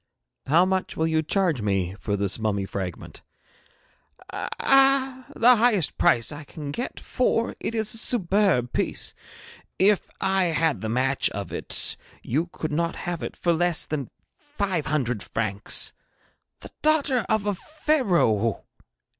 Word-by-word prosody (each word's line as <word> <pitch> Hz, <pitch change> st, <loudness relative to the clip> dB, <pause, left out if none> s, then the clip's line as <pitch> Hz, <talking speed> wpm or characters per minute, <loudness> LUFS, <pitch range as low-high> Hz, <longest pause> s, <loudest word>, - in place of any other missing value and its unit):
'How 165 Hz, +6 st, +5 dB
much 190 Hz, 0 st, -2 dB
will 160 Hz, -, +1 dB
you 160 Hz, -1 st, +1 dB
charge 165 Hz, -, 0 dB
me 95 Hz, -3 st, -1 dB
for 100 Hz, -, -2 dB
this 100 Hz, +1 st, 0 dB
mummy 105 Hz, -3 st, -1 dB
fragment?' 95 Hz, -3 st, -6 dB, 1.1 s
'Ah, 270 Hz, -1 st, +2 dB
the 245 Hz, +1 st, +6 dB
highest 215 Hz, -8 st, +2 dB
price 115 Hz, +3 st, +3 dB
I 145 Hz, +1 st, -8 dB
can 145 Hz, 0 st, -7 dB
get, 245 Hz, -, -5 dB
for 235 Hz, -2 st, 0 dB
it 230 Hz, -, -3 dB
is 220 Hz, -1 st, +1 dB
a 225 Hz, -, +1 dB
superb 195 Hz, -, +2 dB
piece. -, -, -1 dB, 0.6 s
If 200 Hz, +1 st, +3 dB
I 190 Hz, -1 st, +1 dB
had 160 Hz, -, 0 dB
the 110 Hz, -, -3 dB
match 130 Hz, +4 st, +1 dB
of 100 Hz, -1 st, -6 dB
it -, -, 0 dB, 0.3 s
you 155 Hz, +8 st, -1 dB
could 155 Hz, -2 st, -5 dB
not 170 Hz, +2 st, -1 dB
have 175 Hz, -2 st, -3 dB
it -, -, -5 dB
for 170 Hz, -, +1 dB
less 175 Hz, 0 st, +2 dB
than 140 Hz, -5 st, -4 dB, 0.3 s
five 200 Hz, -, -3 dB
hundred 125 Hz, -7 st, -1 dB
francs. 105 Hz, -2 st, -1 dB, 0.7 s
The -, -, -11 dB
daughter 290 Hz, -6 st, +2 dB
of 220 Hz, -2 st, +1 dB
a 205 Hz, -, +1 dB
Pharaoh! 185 Hz, -, 0 dB
170 Hz, 145 wpm, -25 LUFS, -, 1.1 s, the